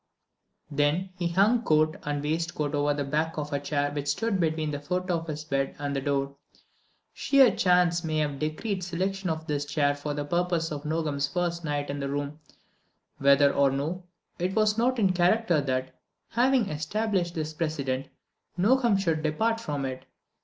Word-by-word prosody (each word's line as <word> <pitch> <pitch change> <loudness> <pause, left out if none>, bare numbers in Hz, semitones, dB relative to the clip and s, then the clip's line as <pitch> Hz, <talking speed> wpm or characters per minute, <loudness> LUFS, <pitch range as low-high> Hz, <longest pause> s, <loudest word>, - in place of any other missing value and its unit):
Then 150 +6 +1
he 175 -2 -1
hung 200 +7 +3
coat 155 -5 +2
and 145 -1 -3
waistcoat 155 -1 -2
over 145 0 +2
the 145 - -1
back 155 +4 -1
of 150 0 -3
a 140 - +1
chair 145 0 -1
which 145 -1 -4
stood 195 +7 0
between 160 -2 0
the 145 - -3
foot 180 +5 -2
of 165 -1 -1
his 150 -1 -4
bed 135 -3 -1
and 145 -1 -3
the 135 - -1
door. 140 0 -1 0.8
Sheer 270 -3 +4
chance 180 -1 +3
may 155 -1 -1
have 145 -3 -1
decreed 185 +6 -2
selection 190 +2 -2
of 160 0 -3
this 145 -2 -1
chair 145 0 +1
for 145 +1 -4
the 145 0 -3
purpose 175 0 0
on 145 -2 -4
Nogam's 150 -3 0
first 170 +1 -2
night 145 -2 -2
in 145 - -4
the 140 0 -3
room; 145 +1 -3 0.8
whether 140 +1 +5
or 140 -1 +4
no, 150 +7 -3 0.4
it 180 +2 -1
was 215 -1 +3
not 250 +3 +1
in 195 -5 +3
character 180 -2 +3
that, 130 -1 -2 0.4
having 245 -1 +2
established 175 +3 -1
this 155 -1 -3
precedent, 140 -5 -2 0.5
Nogam 230 +2 +3
should 165 -5 0
depart 220 +10 0
from 145 -9 -3
it. 130 -1 -6
155 Hz, 175 wpm, -27 LUFS, 145-180 Hz, 0.8 s, whether